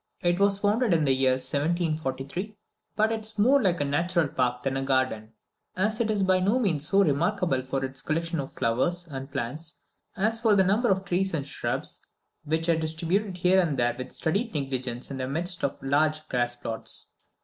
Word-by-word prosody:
It 175 Hz, +1 st, +2 dB
was 200 Hz, 0 st, +3 dB
founded 205 Hz, 0 st, +2 dB
in 160 Hz, -, +2 dB
the 135 Hz, -, +3 dB
year 130 Hz, 0 st, +3 dB
1743, 155 Hz, +5 st, -2 dB, 0.4 s
but 220 Hz, +1 st, +2 dB
is 220 Hz, -1 st, -2 dB
more 260 Hz, +7 st, +5 dB
like 185 Hz, -5 st, +1 dB
a 145 Hz, -, +1 dB
natural 170 Hz, +3 st, +1 dB
park 125 Hz, -2 st, -1 dB
than 135 Hz, -1 st, -1 dB
a 135 Hz, -, -1 dB
garden, 130 Hz, -5 st, 0 dB, 0.4 s
as 215 Hz, +4 st, 0 dB
it 230 Hz, -2 st, +1 dB
is 205 Hz, -2 st, +1 dB
by 185 Hz, -1 st, +3 dB
no 200 Hz, +6 st, +2 dB
means 165 Hz, -, +1 dB
so 200 Hz, 0 st, +4 dB
remarkable 170 Hz, -2 st, +1 dB
for 135 Hz, +1 st, -2 dB
its 135 Hz, 0 st, -5 dB
collection 165 Hz, +2 st, -2 dB
of 135 Hz, -, -4 dB
flowers 170 Hz, +10 st, -1 dB
and 135 Hz, -2 st, -7 dB
plants 155 Hz, +8 st, -4 dB, 0.4 s
as 220 Hz, +3 st, +1 dB
for 220 Hz, -3 st, +4 dB
the 190 Hz, -, +5 dB
number 210 Hz, +6 st, +2 dB
of 190 Hz, 0 st, +1 dB
trees 190 Hz, -1 st, 0 dB
and 140 Hz, -3 st, -2 dB
shrubs, 145 Hz, -, -1 dB, 0.5 s
which 160 Hz, +2 st, 0 dB
are 165 Hz, -1 st, +3 dB
distributed 170 Hz, +5 st, -1 dB
here 180 Hz, +2 st, +4 dB
and 160 Hz, -6 st, +1 dB
there 120 Hz, 0 st, +2 dB
with 130 Hz, +1 st, -7 dB
studied 200 Hz, +6 st, -1 dB
negligence 130 Hz, -3 st, -3 dB
in 135 Hz, -, -4 dB
the 130 Hz, 0 st, -3 dB
midst 170 Hz, +5 st, -1 dB
of 140 Hz, -, -1 dB
large 155 Hz, +3 st, +1 dB
grass 120 Hz, -1 st, 0 dB
plots. 115 Hz, -2 st, -3 dB
165 Hz, 195 wpm, -27 LUFS, 135-195 Hz, 0.5 s, more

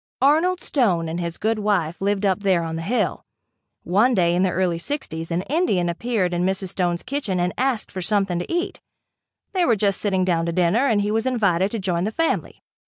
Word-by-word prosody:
Arnold 330 Hz, +6 st, +3 dB
Stone 185 Hz, -, +1 dB
and 165 Hz, +2 st, -3 dB
his 170 Hz, -1 st, -4 dB
good 220 Hz, +1 st, 0 dB
wife 190 Hz, -6 st, 0 dB
lived 200 Hz, +1 st, 0 dB
up 190 Hz, -1 st, +2 dB
there 190 Hz, -4 st, +2 dB
on 165 Hz, 0 st, -4 dB
the 165 Hz, -, -4 dB
hill. 225 Hz, +9 st, -1 dB, 0.6 s
One 220 Hz, +8 st, +3 dB
day 170 Hz, -3 st, +3 dB
in 180 Hz, -, +2 dB
the 190 Hz, -, +3 dB
early 180 Hz, -2 st, 0 dB
60's 165 Hz, -, -4 dB
an 175 Hz, +1 st, -1 dB
Indian 250 Hz, -, +1 dB
appeared 185 Hz, 0 st, -1 dB
in 175 Hz, 0 st, 0 dB
Mrs. 190 Hz, 0 st, -1 dB
Stone's 175 Hz, -1 st, -1 dB
kitchen 255 Hz, -9 st, -2 dB
and 175 Hz, 0 st, 0 dB
asked 255 Hz, -4 st, -1 dB
for 185 Hz, -, -5 dB
something 195 Hz, -2 st, 0 dB
to 175 Hz, -, -5 dB
eat. 350 Hz, +1 st, -2 dB, 0.7 s
They 370 Hz, -2 st, +2 dB
were 240 Hz, -9 st, +3 dB
just 200 Hz, -1 st, 0 dB
sitting 190 Hz, -3 st, +1 dB
down 170 Hz, -2 st, +1 dB
to -, -, 0 dB
dinner 185 Hz, +10 st, +2 dB
and 215 Hz, -5 st, +2 dB
he 205 Hz, +1 st, -1 dB
was 225 Hz, +3 st, 0 dB
invited 200 Hz, -7 st, +2 dB
to 230 Hz, -, -4 dB
join 180 Hz, -3 st, -1 dB
the 215 Hz, -, -1 dB
family. 330 Hz, +8 st, -2 dB
195 Hz, 215 wpm, -22 LUFS, 175-225 Hz, 0.7 s, Arnold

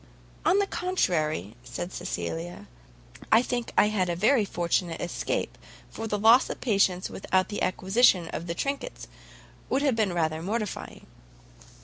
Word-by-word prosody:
"On 380 Hz, -, +4 dB
the 405 Hz, -, +3 dB
contrary," 155 Hz, -, -1 dB
said 175 Hz, +7 st, -6 dB
Cecilia, 85 Hz, +3 st, -5 dB, 0.6 s
"I 225 Hz, +2 st, +6 dB
think 245 Hz, -2 st, -3 dB
I 210 Hz, -, +5 dB
had 190 Hz, -4 st, 0 dB
a 170 Hz, -, 0 dB
very 215 Hz, +5 st, +3 dB
fortunate 170 Hz, -2 st, -1 dB
escape, 175 Hz, -, -2 dB, 0.4 s
for 225 Hz, -, -5 dB
the 210 Hz, -, -1 dB
loss 225 Hz, +5 st, +6 dB
of -, -, -5 dB
patience 195 Hz, -6 st, +2 dB
without 185 Hz, -1 st, 0 dB
the 205 Hz, -, -4 dB
acquisition 190 Hz, -1 st, +3 dB
of 170 Hz, -, -5 dB
the 170 Hz, -, -3 dB
trinkets, 280 Hz, -, -4 dB, 0.6 s
would 270 Hz, +2 st, +1 dB
have 275 Hz, -5 st, +2 dB
been 215 Hz, -4 st, +1 dB
rather 160 Hz, -2 st, -1 dB
mortifying." 210 Hz, +3 st, -4 dB
190 Hz, 145 wpm, -27 LUFS, 170-230 Hz, 0.6 s, I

